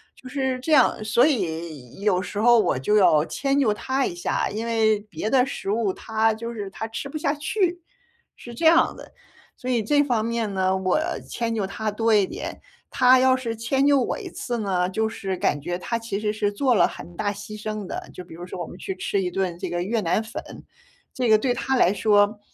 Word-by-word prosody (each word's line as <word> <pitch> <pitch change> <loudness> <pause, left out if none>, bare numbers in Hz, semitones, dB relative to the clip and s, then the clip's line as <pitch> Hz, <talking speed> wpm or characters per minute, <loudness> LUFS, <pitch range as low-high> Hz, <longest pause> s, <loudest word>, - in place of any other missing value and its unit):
就 255 - -12
是 265 -1 -1
这 320 - -3
样。 260 -6 +4
所 235 +4 +4
以 165 - -3
有 195 -3 +2
时 200 +2 -5
候 235 +1 +6
我 175 - +1
就 210 +11 +1
要 155 -6 +5
迁 275 +9 0
就 220 -6 +3
他 265 +4 -1
一 - - -3
下， 175 - -1
因 220 +3 -4
为 220 -2 +2
别 205 0 -5
的 255 -2 +5
食 195 - -4
物 215 -2 +1
他 220 0 0
就 230 +2 -6
是 205 -3 -5
他 220 +4 -6
吃 225 +5 -5
不 310 - -5
下 285 -1 0
去， 350 +3 -1 0.5
是 240 - -11
这 280 - -3
样 335 +1 +5
的。 - - -12 0.5
所 255 - -6
以 240 -3 +2
这 290 +7 +3
方 240 -6 0
面 230 -3 -2
呢， 190 0 +1
我 190 +8 +1 0.3
迁 230 -1 -2
就 205 - -1
他 215 +2 -3
多 225 +1 +1
一 205 -2 +4
点， - - -7 0.3
他 255 -1 +5
要 260 0 +4
是 235 -3 -3
迁 265 +5 0
就 285 -1 +5
我 - - -1
一 - - -7
次 240 - -4
呢， 185 -3 0
就 220 +3 0
是 190 -3 -4
感 145 - 0
觉 175 +5 -3
他 230 +5 -2
其 225 -3 -4
实 210 0 -1
是 210 -1 0
做 250 +4 +1
了 - - +5
很 175 - -10
大 205 -1 0
牺 210 +1 -9
牲 215 -2 -4
的。 - - -6
就 180 - -8
比 175 - -14
如 175 - -8
说 180 - -7
我 - - -4
们 - - -11
去 190 0 -5
吃 195 +1 -1
一 180 - -1
顿 185 -3 -2
这 - - -4
个 175 0 -2
越 220 +4 -1
南 175 +3 +1
粉， 220 - -6 0.7
这 250 -3 0
个 215 - +7
对 245 +3 0
他 265 +2 -1
来 190 -5 +4
说 205 0 +3
220 Hz, 250 characters per minute, -24 LUFS, 195-250 Hz, 0.7 s, 个